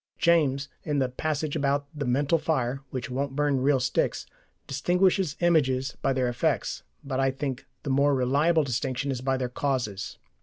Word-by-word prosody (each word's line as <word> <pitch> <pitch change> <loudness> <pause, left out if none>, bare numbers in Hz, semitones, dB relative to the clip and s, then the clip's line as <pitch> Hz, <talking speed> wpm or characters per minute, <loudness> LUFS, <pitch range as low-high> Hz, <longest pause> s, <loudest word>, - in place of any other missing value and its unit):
James, 145 -5 +3 0.2
in 150 -2 -1
the 130 -2 +2
passage 155 +2 -2
about 140 -1 +1
the 145 -3 -3
mental 140 +6 +2
fire 135 -4 -1
which 130 -1 -5
won't 135 +1 -2
burn 145 -2 +1
real 135 0 +3
sticks, 130 +1 0 0.4
distinguishes 180 +3 +1
images 135 -6 +2
by - - +2
their 130 -1 +1
effects, 120 0 -1 0.2
but 135 -1 -3
I 135 0 +3
think 135 -1 -4 0.2
the 140 - -2
more 140 +1 +3
reliable 145 +6 +3
distinction 135 +1 -2
is 125 -2 -3
by 130 0 0
their 130 -1 -1
causes. 125 -6 -2
140 Hz, 165 wpm, -27 LUFS, 130-150 Hz, 0.4 s, James